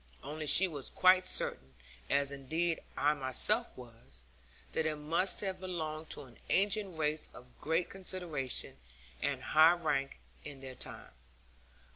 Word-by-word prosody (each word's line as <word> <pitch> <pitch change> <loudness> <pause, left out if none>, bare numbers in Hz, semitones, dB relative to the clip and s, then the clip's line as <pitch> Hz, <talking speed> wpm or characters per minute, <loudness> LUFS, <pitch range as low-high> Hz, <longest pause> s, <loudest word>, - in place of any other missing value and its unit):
Only 155 +1 -5
she 185 +7 +8
was 145 -6 -7
quite 185 0 +5
certain, 65 - -2 0.3
as 140 0 +2
indeed 160 +5 -2 0.2
I 145 +1 +3
myself 150 - +2
was, 115 - -13 0.5
that 160 - 0
it 155 - -1
must 165 +6 +1
have 190 -2 -3
belonged 160 -4 -5
to - - -4
an 125 -3 -17
ancient 200 -2 +1
race 155 0 0
of 125 0 -14
great 165 +3 0
consideration, 175 - -3 0.4
and - - -1
high 160 +2 +6
rank, 140 -5 -1 0.3
in 140 -2 -9
their 130 -1 -8
time. - - -8
155 Hz, 140 wpm, -33 LUFS, 135-180 Hz, 0.5 s, she